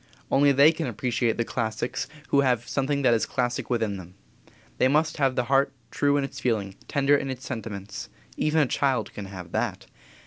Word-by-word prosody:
Only 140 Hz, +1 st, +5 dB
they 140 Hz, +3 st, +7 dB
can 165 Hz, -2 st, -3 dB
appreciate 120 Hz, 0 st, 0 dB
the 115 Hz, -, 0 dB
classics 110 Hz, +1 st, -2 dB, 0.2 s
who 140 Hz, -, +4 dB
have 125 Hz, -3 st, +1 dB
something 140 Hz, +1 st, 0 dB
that 120 Hz, -, +5 dB
is 115 Hz, -, +1 dB
classic 125 Hz, -2 st, -1 dB
within 110 Hz, -5 st, 0 dB
them. 90 Hz, 0 st, -11 dB, 0.6 s
They 130 Hz, -, +5 dB
must 155 Hz, +4 st, +2 dB
have 135 Hz, -3 st, +2 dB
the 125 Hz, -, +1 dB
heart 135 Hz, +2 st, +2 dB, 0.2 s
true 145 Hz, 0 st, +2 dB
in 140 Hz, -, +1 dB
its 140 Hz, 0 st, -6 dB
feeling, 110 Hz, -7 st, -1 dB
tender 140 Hz, 0 st, +3 dB
in 135 Hz, -, -1 dB
its 130 Hz, 0 st, -6 dB
sentiments. 105 Hz, -5 st, -6 dB, 0.3 s
Even 155 Hz, +1 st, +2 dB
a -, -, +4 dB
child 130 Hz, -3 st, 0 dB
can 105 Hz, -, -6 dB
have 90 Hz, -3 st, -9 dB
that. -, -, -2 dB
130 Hz, 195 wpm, -26 LUFS, 110-140 Hz, 0.6 s, they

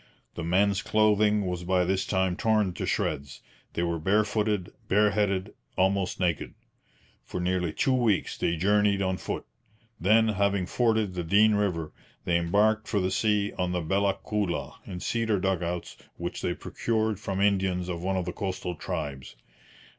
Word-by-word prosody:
The 85 Hz, -, -5 dB
men's 95 Hz, +4 st, +2 dB
clothing 105 Hz, -1 st, +3 dB
was 90 Hz, -1 st, -3 dB
by 90 Hz, 0 st, +2 dB
this 95 Hz, +1 st, 0 dB
time 95 Hz, -2 st, +1 dB
torn 105 Hz, -3 st, +1 dB
to -, -, -4 dB
shreds. 70 Hz, -1 st, -2 dB, 0.3 s
They 85 Hz, -, -1 dB
were 85 Hz, -1 st, -1 dB
barefooted, 105 Hz, +1 st, +1 dB, 0.2 s
bareheaded, 100 Hz, -1 st, +2 dB, 0.2 s
almost 95 Hz, 0 st, +1 dB
naked. 85 Hz, -4 st, -1 dB, 0.7 s
For -, -, -5 dB
nearly 90 Hz, -1 st, 0 dB
two 135 Hz, -, +1 dB
weeks 115 Hz, -6 st, +1 dB
they 85 Hz, -, 0 dB
journeyed 100 Hz, +2 st, +2 dB
on 95 Hz, -1 st, 0 dB
foot; -, -, -5 dB, 0.5 s
then, 110 Hz, +5 st, +4 dB
having 100 Hz, -2 st, +1 dB
forded 110 Hz, -2 st, +1 dB
the 90 Hz, -1 st, -3 dB
Dean 105 Hz, +6 st, +4 dB
river, 90 Hz, -7 st, -1 dB, 0.3 s
they 85 Hz, -1 st, +2 dB
embarked 105 Hz, +6 st, +2 dB
for 105 Hz, -, 0 dB
the 95 Hz, 0 st, 0 dB
sea 105 Hz, -2 st, +1 dB
on 90 Hz, 0 st, 0 dB
the 90 Hz, -, 0 dB
Bella 95 Hz, +4 st, +1 dB
Coola 105 Hz, -5 st, -2 dB
in 90 Hz, -1 st, -6 dB
cedar 115 Hz, -3 st, 0 dB
dug 95 Hz, -1 st, 0 dB
outs 85 Hz, 0 st, -4 dB, 0.2 s
which 85 Hz, +1 st, -4 dB
they 85 Hz, -, -1 dB
procured 110 Hz, -3 st, -1 dB
from 95 Hz, -3 st, -3 dB
Indians 95 Hz, -3 st, +1 dB
of 85 Hz, -2 st, -4 dB
one 95 Hz, +1 st, -1 dB
of 90 Hz, -, -1 dB
the 90 Hz, -, -4 dB
coastal 95 Hz, -3 st, -3 dB
tribes. 70 Hz, -5 st, -5 dB
95 Hz, 160 wpm, -27 LUFS, 90-105 Hz, 0.7 s, then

